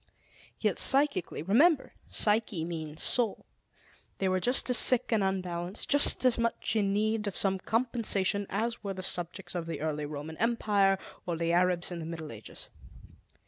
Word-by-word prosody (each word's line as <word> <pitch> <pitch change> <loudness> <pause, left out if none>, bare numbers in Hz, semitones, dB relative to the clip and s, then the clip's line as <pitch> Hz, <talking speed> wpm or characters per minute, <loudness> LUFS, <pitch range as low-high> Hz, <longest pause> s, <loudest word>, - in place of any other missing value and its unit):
Yet, - - 0
psychically 275 - +2
remember, 275 - +3 0.2
"psyche" 210 -6 0
means 160 -2 -6
"soul" 235 -4 0 0.7
they 195 - -1
were 185 0 +1
just 250 +7 +2
as 245 - +6
sick 255 -2 +5
and 220 -3 +2
unbalanced, 185 0 -3
just 285 -2 +4
as 250 -2 +4
much 230 0 -1
in 200 -2 +1
need 215 +1 -1
of 200 - -4
some 190 -1 +1
compensation 220 -4 0
as 225 +3 -3
were 195 -1 -4
the 185 - -6
subjects 175 +1 -3
of 170 -2 -4
the 165 - -5
early 150 -1 -3
Roman 150 +2 -7
empire, 205 -4 +1 0.3
or 170 -2 -2
the 170 +1 -1
Arabs 180 0 +1
in 175 - -5
the 160 - -6
Middle 160 -2 -7
Ages. 110 -1 -10
195 Hz, 165 wpm, -29 LUFS, 170-225 Hz, 0.7 s, as